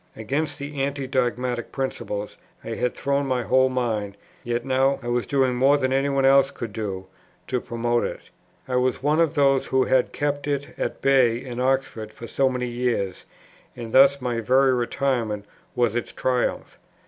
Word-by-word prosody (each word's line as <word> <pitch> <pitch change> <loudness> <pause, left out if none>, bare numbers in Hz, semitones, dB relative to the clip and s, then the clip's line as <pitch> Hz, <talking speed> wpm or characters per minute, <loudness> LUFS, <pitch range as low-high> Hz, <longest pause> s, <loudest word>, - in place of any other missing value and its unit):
Against 145 +7 -2
the 140 -1 -5
Anti 140 0 -2
dogmatic 125 -2 -1
principle 105 -6 -3 0.4
I - - -7
had 125 - -1
thrown 140 0 0
my 125 -2 0
whole 130 +1 +3
mind; 110 -6 -2 0.3
yet 120 +1 -2
now 135 +1 +2
I 120 - -4
was 120 0 0
doing 135 -2 +2
more 135 +4 +4
than 130 -1 0
any 135 +1 +1
one 135 -1 +1
else 135 0 +5
could 115 -6 -7
do, 95 -4 -4 0.4
to 125 -1 -2
promote 120 0 -1
it. - - -6 0.4
I 125 -1 0
was 125 0 0
one 150 +2 +2
of 165 -1 +1
those 135 -2 +3
who 130 0 +2
had 130 -1 +2
kept 145 0 -2
it 145 -1 -2
at - - -4
bay 130 -4 +4
in 125 -1 -7
Oxford 130 -4 -1
for 115 - -9
so 135 +3 +1
many 125 -1 -2
years; 120 -6 -2 0.5
and 115 -2 -7
thus 140 +2 +6
my 125 -2 -2
very 130 +3 +4
retirement 120 -4 -1 0.3
was 120 -2 +1
its 120 - -2
triumph. 125 -1 -2
130 Hz, 180 wpm, -24 LUFS, 120-135 Hz, 0.5 s, thus